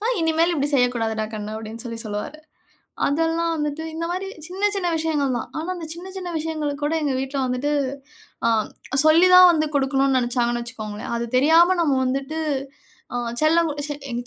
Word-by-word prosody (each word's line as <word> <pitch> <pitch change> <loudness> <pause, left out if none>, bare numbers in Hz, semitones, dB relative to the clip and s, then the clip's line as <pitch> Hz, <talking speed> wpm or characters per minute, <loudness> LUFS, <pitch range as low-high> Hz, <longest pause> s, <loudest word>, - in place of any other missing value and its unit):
ஆனா, 450 +3 0
இனிமேல் 325 +2 +2
இப்டி 285 -2 0
செய்யக்கூடாதுடா 230 -4 +1
கண்ணு 210 0 -5
அப்டின்னு 220 +2 -8
சொல்லி 230 -1 -6
சொல்லுவாரு. 210 +8 -5 0.7
அதெல்லாம் 330 +3 +1
வந்துட்டு 300 +1 -3
இந்த 330 +1 -3
மாரி 370 +2 -3 0.2
சின்ன 385 +4 0
சின்ன 380 -3 -1
விஷயங்கள் 295 -5 0
தான். - - -6
ஆனா, 320 +3 -4
அந்த 335 -2 -6
சின்னச் 375 +3 -10
சின்ன 360 -2 -5
விஷயங்களுக்கு 305 -2 -3
கூட 300 - 0
எங்க 290 -2 0
வீட்ல 270 +1 -3
வந்துட்டு, 255 +4 -1 0.7
ஆ, - - +4 0.6
சொல்லித் 350 +4 +6
தான் 365 0 +10
வந்து 310 -2 +1
குடுக்கணும்னு 270 -1 +2
நெனச்சாங்கன்னு 240 -1 0
வச்சுக்கோங்களேன். 215 -3 -6
அது 235 - -2
தெரியாம 330 +7 +5
நம்ம 310 -5 +2
வந்துட்டு, 270 +4 -2 0.8
ஆ, - - 0 0.2
செல்லம் 325 +2 +3
குடு 290 -1 -4 0.3
எங்க 240 0 -3
290 Hz, 170 wpm, -22 LUFS, 245-330 Hz, 0.8 s, தான்